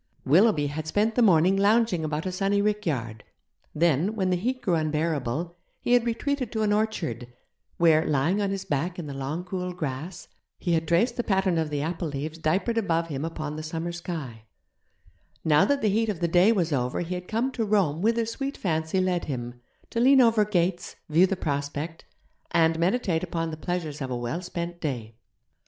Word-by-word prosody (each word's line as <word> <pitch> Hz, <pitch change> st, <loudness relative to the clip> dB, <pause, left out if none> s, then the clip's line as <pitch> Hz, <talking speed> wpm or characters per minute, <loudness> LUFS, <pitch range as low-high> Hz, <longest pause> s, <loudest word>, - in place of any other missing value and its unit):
Willoughby 165 Hz, -, +4 dB
had 155 Hz, +2 st, -4 dB
spent 210 Hz, +7 st, +1 dB
the 245 Hz, -, +2 dB
morning 185 Hz, -3 st, +5 dB
lounging 205 Hz, -3 st, +3 dB
about 155 Hz, +1 st, -2 dB
a 185 Hz, -, -1 dB
sunny 195 Hz, +2 st, +1 dB
rickyard; 155 Hz, -, -1 dB, 0.5 s
then, 170 Hz, +5 st, +2 dB
when 190 Hz, -3 st, 0 dB
the -, -, +3 dB
heat 250 Hz, +8 st, -1 dB
grew 180 Hz, -, +1 dB
unbearable, 155 Hz, 0 st, -1 dB, 0.2 s
he 245 Hz, -, 0 dB
had 245 Hz, -1 st, +4 dB
retreated 255 Hz, +1 st, -1 dB
to 220 Hz, -2 st, -1 dB
an 205 Hz, -1 st, +2 dB
orchard, 160 Hz, -, -2 dB, 0.5 s
where, 160 Hz, -2 st, +5 dB
lying 155 Hz, +8 st, +1 dB
on 200 Hz, -, 0 dB
his 195 Hz, -1 st, -3 dB
back 170 Hz, +1 st, -2 dB
in 175 Hz, -, -5 dB
the 145 Hz, -, -6 dB
long 135 Hz, +6 st, -4 dB
cool 180 Hz, 0 st, -4 dB
grass, 160 Hz, +3 st, -5 dB, 0.3 s
he 175 Hz, -, -1 dB
had 165 Hz, -1 st, 0 dB
traced 230 Hz, -, +2 dB
the 240 Hz, -, 0 dB
pattern 190 Hz, -5 st, +1 dB
of 160 Hz, -1 st, -1 dB
the 145 Hz, -1 st, -2 dB
apple 165 Hz, +1 st, -3 dB
leaves 155 Hz, +3 st, -5 dB
diapered 185 Hz, +9 st, +1 dB
above 170 Hz, -5 st, 0 dB
him 140 Hz, -1 st, -3 dB
upon 155 Hz, -2 st, -4 dB
the -, -, -4 dB
summer 165 Hz, +2 st, -4 dB
sky; 155 Hz, -10 st, -6 dB, 1.0 s
now 150 Hz, -1 st, +5 dB
that 285 Hz, -3 st, 0 dB
the -, -, +3 dB
heat 220 Hz, +2 st, +1 dB
of 195 Hz, -6 st, -2 dB
the 170 Hz, -, +1 dB
day 180 Hz, +5 st, +5 dB
was 175 Hz, -8 st, +1 dB
over 125 Hz, +1 st, -1 dB
he 175 Hz, +1 st, -3 dB
had 180 Hz, 0 st, -5 dB
come 235 Hz, +4 st, 0 dB
to 240 Hz, -3 st, -2 dB
roam 195 Hz, -7 st, +1 dB
whither 230 Hz, +2 st, +2 dB
sweet 270 Hz, +5 st, -4 dB
fancy 160 Hz, 0 st, -1 dB
led 185 Hz, -2 st, 0 dB
him, 120 Hz, -3 st, -5 dB, 0.3 s
to 230 Hz, -, -1 dB
lean 265 Hz, +3 st, +6 dB
over 230 Hz, -3 st, +5 dB
gates, 180 Hz, -3 st, -1 dB
view 170 Hz, +5 st, +5 dB
the 195 Hz, -, -1 dB
prospect, 145 Hz, 0 st, -4 dB, 0.4 s
and 165 Hz, -1 st, +2 dB
meditate 175 Hz, -2 st, +1 dB
upon 165 Hz, -2 st, -2 dB
the -, -, -4 dB
pleasures 160 Hz, -3 st, -4 dB
of 135 Hz, -, -3 dB
a 125 Hz, -, -2 dB
well 120 Hz, +9 st, -3 dB
spent 175 Hz, -1 st, -5 dB
day. 120 Hz, -7 st, -4 dB
170 Hz, 195 wpm, -26 LUFS, 155-200 Hz, 1.0 s, lean